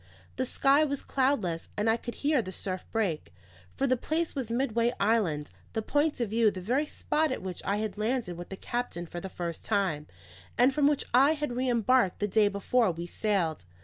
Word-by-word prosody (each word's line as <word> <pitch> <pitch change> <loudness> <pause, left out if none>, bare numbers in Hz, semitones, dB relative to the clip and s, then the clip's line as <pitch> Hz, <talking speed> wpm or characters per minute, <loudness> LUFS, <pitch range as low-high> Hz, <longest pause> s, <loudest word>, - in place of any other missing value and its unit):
The 260 - 0
sky 275 +4 +4
was 280 -2 -2
cloudless, 235 -12 0
and 210 +2 0
I 225 - +4
could 240 +1 -6
hear 295 -3 +4
the 185 - -7
surf 185 0 -5
break. 180 - -1 0.5
For 275 - +1
the 255 -1 +3
place 315 +6 -1
was 265 -6 -4
Midway 235 -1 +1
Island; 195 -9 +1 0.2
the 220 - -1
point 290 +4 +1
of 230 -4 -1
view 225 -1 +4
the 190 - -6
very 255 +11 0
spot 310 0 0
at 260 - -3
which 185 -2 -5
I 200 - 0
had 215 -1 -3
landed 220 -5 -1
with 175 +1 -8
the 195 - -6
captain 240 -8 -3
for 175 +1 -7
the 190 - -6
first 170 -3 -5
time, 185 -8 0 0.5
and 250 +3 +5
from 285 0 +3
which 290 -1 +1
I 275 +5 +6
had 295 -5 -3
re 255 +1 0
embarked 235 -3 +3
the 205 - -1
day 210 +1 +4
before 205 +3 +1
we 170 0 -4
sailed. 175 - -1
225 Hz, 210 wpm, -29 LUFS, 190-260 Hz, 0.5 s, I